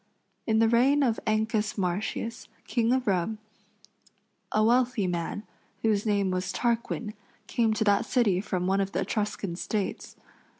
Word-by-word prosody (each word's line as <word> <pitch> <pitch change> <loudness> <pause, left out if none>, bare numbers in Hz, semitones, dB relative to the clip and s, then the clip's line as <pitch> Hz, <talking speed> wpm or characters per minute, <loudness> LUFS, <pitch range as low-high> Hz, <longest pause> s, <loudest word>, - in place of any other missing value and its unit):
In 220 -1 +3
the 225 0 +5
reign 260 +5 +4
of 235 -4 +1
Ancus 215 0 0
Martius, 200 +6 -2 0.2
King 235 -2 +1
of 255 0 +1
Rome, 195 +2 0 1.1
a 215 - +3
wealthy 240 -2 +3
man, 175 +3 -3 0.4
whose 215 -1 +1
name 200 -2 +1
was 185 0 -2
Tarquin, 235 -2 -1 0.3
came 230 -2 +1
to 215 - +1
that 205 -1 +2
city 205 -8 +2
from 185 -3 -2
one 195 +1 +2
of 195 0 -3
the 190 - 0
Etruscan 205 -2 -2
States. 200 +2 -3
215 Hz, 145 wpm, -27 LUFS, 195-230 Hz, 1.1 s, the